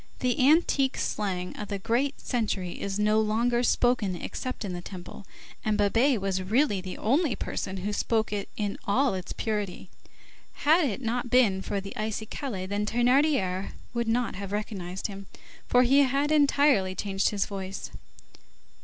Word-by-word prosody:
The 255 Hz, +2 st, +2 dB
antique 285 Hz, -4 st, +3 dB
slang 185 Hz, -3 st, -2 dB
of 210 Hz, -, -4 dB
the 200 Hz, 0 st, -3 dB
great 245 Hz, +8 st, 0 dB
century 205 Hz, -7 st, -2 dB
is 200 Hz, 0 st, -2 dB
no 210 Hz, +1 st, +3 dB
longer 235 Hz, +3 st, +1 dB
spoken 240 Hz, -5 st, +2 dB
except 255 Hz, +5 st, -5 dB
in 190 Hz, -, -4 dB
the 175 Hz, -, -5 dB
Temple, 185 Hz, +1 st, -9 dB, 0.4 s
and 215 Hz, -1 st, +1 dB
Babet 225 Hz, +5 st, +3 dB
was 190 Hz, -1 st, -1 dB
really 210 Hz, +1 st, +1 dB
the 185 Hz, 0 st, -7 dB
only 275 Hz, +3 st, +1 dB
person 190 Hz, -, -4 dB
who 200 Hz, +3 st, -3 dB
spoke 220 Hz, 0 st, 0 dB
it 200 Hz, -1 st, -3 dB
in 205 Hz, -2 st, -2 dB
all 260 Hz, +5 st, +3 dB
its 185 Hz, -1 st, -5 dB
purity. 205 Hz, -4 st, -3 dB, 0.7 s
Had 320 Hz, +3 st, +5 dB
it 255 Hz, -1 st, -2 dB
not 245 Hz, +1 st, -2 dB
been 220 Hz, -7 st, +4 dB
for 200 Hz, -, -2 dB
the 195 Hz, 0 st, -7 dB
icicaille, 215 Hz, -1 st, -4 dB
Thénardier 210 Hz, -1 st, +1 dB, 0.2 s
would 235 Hz, -1 st, -1 dB
not 235 Hz, +1 st, +1 dB
have 200 Hz, -1 st, -6 dB
recognized 190 Hz, -3 st, -4 dB
him, 195 Hz, -2 st, -5 dB, 0.4 s
for 250 Hz, 0 st, +5 dB
he 270 Hz, +3 st, +5 dB
had 280 Hz, +2 st, +2 dB
entirely 280 Hz, -10 st, +3 dB
changed 195 Hz, -1 st, 0 dB
his 200 Hz, -2 st, 0 dB
voice. 195 Hz, -1 st, -6 dB
215 Hz, 155 wpm, -27 LUFS, 195-250 Hz, 0.7 s, Had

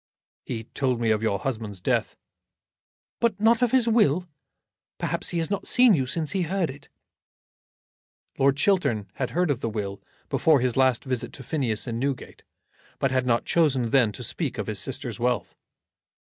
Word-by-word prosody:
"He 115 Hz, -3 st, -4 dB
told 125 Hz, +1 st, -1 dB
me 115 Hz, -2 st, +1 dB
of 110 Hz, -1 st, +1 dB
your 110 Hz, -3 st, +1 dB
husband's 110 Hz, -4 st, -4 dB
death." -, -, 0 dB, 1.0 s
"But 230 Hz, -4 st, +1 dB
not 225 Hz, +2 st, +4 dB
of 245 Hz, -, +3 dB
his 250 Hz, -1 st, +3 dB
will? 185 Hz, -7 st, +3 dB, 0.7 s
Perhaps -, -, -1 dB
he 175 Hz, -, -2 dB
has 165 Hz, +3 st, -1 dB
not 200 Hz, -, -2 dB
seen 245 Hz, -3 st, +6 dB
you 135 Hz, -7 st, +1 dB
since 155 Hz, +2 st, -2 dB
he 190 Hz, -, 0 dB
heard 175 Hz, -2 st, -1 dB
it." 140 Hz, +2 st, -15 dB, 1.5 s
Lord 135 Hz, 0 st, +3 dB
Chiltern 135 Hz, -, +1 dB
had 130 Hz, -, -1 dB
heard 175 Hz, -2 st, +1 dB
of 130 Hz, -, -1 dB
the 115 Hz, -, -2 dB
will 100 Hz, -2 st, -4 dB, 0.3 s
before 155 Hz, -3 st, +3 dB
his 125 Hz, -1 st, 0 dB
last 130 Hz, -3 st, +3 dB
visit 130 Hz, -3 st, -2 dB
to 135 Hz, -, -10 dB
Phineas 120 Hz, -6 st, -1 dB
in 115 Hz, -2 st, -3 dB
Newgate, 135 Hz, 0 st, -4 dB, 0.6 s
but 135 Hz, -, 0 dB
had 130 Hz, -1 st, 0 dB
not 120 Hz, -1 st, +2 dB
chosen 135 Hz, -8 st, +2 dB
then 125 Hz, -6 st, +4 dB
to -, -, -8 dB
speak -, -, -2 dB
of -, -, -2 dB
his -, -, -3 dB
sister's -, -, -3 dB
wealth. 120 Hz, -1 st, -1 dB
135 Hz, 175 wpm, -25 LUFS, 115-170 Hz, 1.5 s, seen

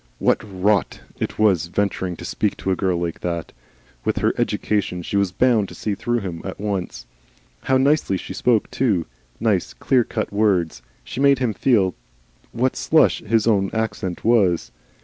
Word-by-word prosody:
What -, -, +2 dB
rot 100 Hz, -1 st, 0 dB, 0.2 s
it -, -, -3 dB
was 95 Hz, -6 st, +3 dB
venturing 95 Hz, -1 st, -1 dB
to -, -, -9 dB
speak 105 Hz, -, -1 dB
to 95 Hz, -, -2 dB
a -, -, +2 dB
girl 90 Hz, -1 st, 0 dB
like 85 Hz, -1 st, -3 dB
that! 85 Hz, -2 st, -4 dB, 0.5 s
With -, -, -1 dB
her -, -, +2 dB
education 95 Hz, -4 st, -1 dB
she 100 Hz, -, -4 dB
was 100 Hz, -2 st, +2 dB
bound 110 Hz, -1 st, +2 dB
to -, -, -11 dB
see 105 Hz, -, -2 dB
through 120 Hz, +4 st, -1 dB
him 90 Hz, -4 st, -5 dB
at 95 Hz, -, -6 dB
once. 95 Hz, -12 st, -3 dB, 0.6 s
How 130 Hz, -, +3 dB
nicely 135 Hz, -7 st, +2 dB
she -, -, -7 dB
spoke 115 Hz, -4 st, +1 dB
too! 105 Hz, -11 st, +1 dB, 0.3 s
nice -, -, 0 dB
clear 125 Hz, -, +2 dB
cut 110 Hz, -2 st, -4 dB
words! 95 Hz, -, +1 dB, 0.2 s
She -, -, -7 dB
made 140 Hz, 0 st, +5 dB
him 125 Hz, -4 st, 0 dB
feel 95 Hz, -4 st, +2 dB, 0.6 s
what 130 Hz, +2 st, 0 dB
slush 160 Hz, -, +3 dB
his 110 Hz, 0 st, +1 dB
own 100 Hz, -4 st, +2 dB
accent 110 Hz, -5 st, -3 dB
was. 100 Hz, -8 st, +3 dB
100 Hz, 170 wpm, -22 LUFS, 90-115 Hz, 0.6 s, made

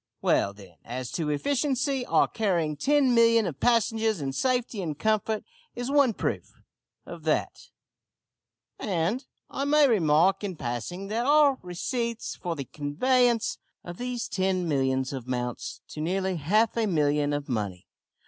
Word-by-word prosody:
Well, 100 Hz, -, +2 dB
then, 100 Hz, -1 st, -15 dB
as 125 Hz, +1 st, -5 dB
to 160 Hz, -3 st, -2 dB
efficiency. 270 Hz, -, 0 dB
Our -, -, +4 dB
carrying 175 Hz, -8 st, 0 dB
ten 275 Hz, -, +3 dB
millions 230 Hz, -2 st, +5 dB
of 145 Hz, -, -10 dB
passengers 225 Hz, -3 st, +2 dB
in 135 Hz, -2 st, -3 dB
safety 245 Hz, -, 0 dB
and 155 Hz, -5 st, -4 dB
comfort 215 Hz, +1 st, 0 dB, 0.3 s
is 245 Hz, +2 st, -3 dB
one 280 Hz, -6 st, +4 dB
proof -, -, -3 dB, 0.5 s
of -, -, -9 dB
that -, -, -1 dB, 1.1 s
and, 195 Hz, -, -1 dB, 0.3 s
I 275 Hz, -, -2 dB
may 295 Hz, 0 st, +5 dB
remark 180 Hz, -, +3 dB
in 195 Hz, -3 st, -3 dB
passing, 135 Hz, -, -4 dB
that 230 Hz, +4 st, -1 dB
our 290 Hz, -2 st, +5 dB
receipts 230 Hz, +6 st, -3 dB
for 170 Hz, -2 st, -4 dB
the 140 Hz, -3 st, -5 dB
conveyance 235 Hz, -, +1 dB, 0.2 s
of 175 Hz, 0 st, -8 dB
these 245 Hz, -1 st, -3 dB
ten 185 Hz, -2 st, 0 dB
millions 130 Hz, -2 st, 0 dB
amounts 125 Hz, -2 st, -4 dB
to 155 Hz, -, -6 dB
nearly 185 Hz, +2 st, -1 dB
half 210 Hz, +9 st, +2 dB
a 225 Hz, -2 st, +2 dB
million 150 Hz, -4 st, +1 dB
of 145 Hz, -1 st, -3 dB
money. 100 Hz, -7 st, -3 dB
190 Hz, 145 wpm, -27 LUFS, 145-240 Hz, 1.1 s, millions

